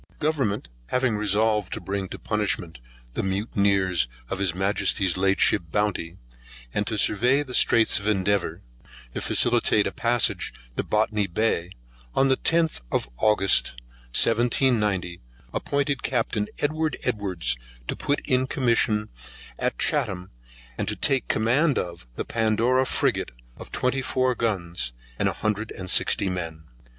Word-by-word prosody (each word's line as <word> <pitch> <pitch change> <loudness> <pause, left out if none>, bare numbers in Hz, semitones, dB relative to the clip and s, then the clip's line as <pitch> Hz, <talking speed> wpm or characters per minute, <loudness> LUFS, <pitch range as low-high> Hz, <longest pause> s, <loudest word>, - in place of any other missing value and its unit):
GOVERNMENT 135 - -1 0.2
having 125 -3 +1
resolved 105 -1 +1
to - - -4
bring 95 -1 -4
to - - -7
punishment 105 - -2 0.3
the - - -1
mutineers 95 - +1 0.2
of 95 - -2
His 95 -3 0
Majesty's 95 -1 +1
late 95 +1 +2
ship - - +4
Bounty, 95 -4 -1 0.6
and 105 - -1
to 110 - -2
survey 125 +8 +3
the 130 -3 -9
Straits 115 -3 +4
of 100 - -6
Endeavour, 100 -1 0 0.5
to - - -3
facilitate 120 -3 +3
a 100 - -1
passage 120 +1 +1 0.2
to - - 0
Botany 105 -1 0
Bay, 95 -2 -1 0.4
on 135 0 +3
the 130 - +4
10th 165 - +1
of - - 0
August 105 -3 +3 0.4
1790, 110 -6 +2 0.3
appointed 140 -2 -1
Captain 105 -1 -1
Edward 155 0 -1
Edwards 95 - -1 0.3
to - - -2
put 145 - -1
in 130 0 +2
commission 115 -5 +2 0.5
at - - -1
Chatham, 90 0 -1 0.5
and - - -2
take 135 -3 +2
command 130 +7 +2
of 85 -8 -4
the - - -3
Pandora 115 +4 +1
Frigate - - 0 0.3
of - - -10
twenty 130 +1 0
four 130 0 +1
guns, 90 - -2 0.3
and - - +2
a - - -3
hundred 110 +1 -2
and 90 -1 -5
sixty 100 - +3
men. 80 -4 -4
105 Hz, 140 wpm, -25 LUFS, 95-125 Hz, 0.6 s, ship